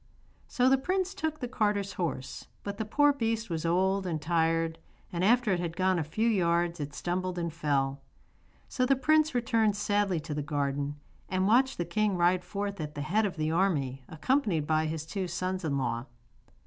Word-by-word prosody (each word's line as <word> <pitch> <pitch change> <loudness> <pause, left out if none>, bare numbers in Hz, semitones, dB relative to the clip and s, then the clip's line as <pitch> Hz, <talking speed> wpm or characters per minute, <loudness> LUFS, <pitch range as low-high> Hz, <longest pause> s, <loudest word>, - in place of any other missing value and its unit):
So 250 0 +2
the 265 0 +5
prince 375 +5 -1
took 315 -5 -3
the 250 - -2
carter's 205 -5 0
horse, 165 -8 -4 0.2
but 200 0 -5
the 220 - -1
poor 290 +6 +4
beast 225 -5 -2
was 165 0 -1
old 190 +2 +1
and 160 -3 -1
tired, 165 0 +1 0.3
and 175 +1 -1
after 235 +1 +4
it 180 - +1
had 170 -1 -4
gone 185 -1 +2
a - - 0
few 220 +10 -1
yards 175 -4 +1
it 145 0 -5
stumbled 180 +1 -2
and 170 -2 -2
fell. 140 -4 0 0.7
So 255 - -1
the 275 - +4
prince 310 +2 +3
returned 225 -3 +2
sadly 205 -3 +1
to 150 0 -5
the 150 - -2
garden 145 -1 -2 0.3
and 185 +1 +1
watched 260 +5 +3
the 175 - -1
king 200 +2 0
ride 180 +1 +3
forth 200 -2 -4
at 150 0 -6
the 145 - -4
head 205 +8 +1
of 185 - -6
the 155 0 0
army 150 -8 +1
accompanied 180 - +1
by 155 0 +1
his 155 0 -4
two 190 +2 -3
sons 185 +2 -3
in 145 -3 0
law. 120 -1 -2
180 Hz, 195 wpm, -29 LUFS, 160-215 Hz, 0.7 s, the